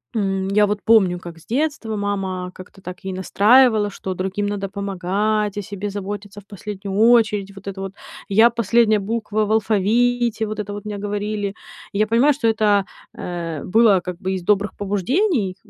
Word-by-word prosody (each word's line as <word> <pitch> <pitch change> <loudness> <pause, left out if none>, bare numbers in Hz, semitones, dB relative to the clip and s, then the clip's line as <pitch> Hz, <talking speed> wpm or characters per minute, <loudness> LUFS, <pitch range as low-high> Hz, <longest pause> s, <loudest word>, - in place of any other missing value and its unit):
м, 195 -2 0
я 210 +1 +4
вот 205 0 -2
помню, 195 -6 +4
как 170 -2 -10
с - - -20
детства 265 -4 -1
мама 190 -3 -3
как-то 185 +1 -13
так 180 0 -9
ей 190 - -3
настраивала, 215 +3 +4
что 190 -1 -5
другим 190 +2 -2
надо 200 -1 -3
помогать, 200 +2 -1
о - - -1
себе 200 +1 -5
заботиться 205 0 -6
в - - -28
последнюю 200 -1 -6
очередь, 215 -4 +4
вот 195 0 -12
это 195 -1 -5
вот: 195 0 -5 0.4
"я"- 220 +4 +6
последняя 230 -1 +2
буква 215 +1 -1
в 210 - -3
алфавите, 225 +2 +1
вот 215 0 -5
это 205 -1 -4
вот 205 0 -7
мне 210 -1 -4
говорили. 205 0 -3 0.4
Я 215 +2 +1
понимаю, 240 +7 +4
что 255 -4 -1
это, 210 -3 +3 0.3
э, 170 -4 -5
было 210 -1 +4
как 180 -1 -6
бы 190 - -2
из 185 -2 -4
добрых 205 +1 +2
побуждений 205 - 0
205 Hz, 175 wpm, -21 LUFS, 195-220 Hz, 0.4 s, я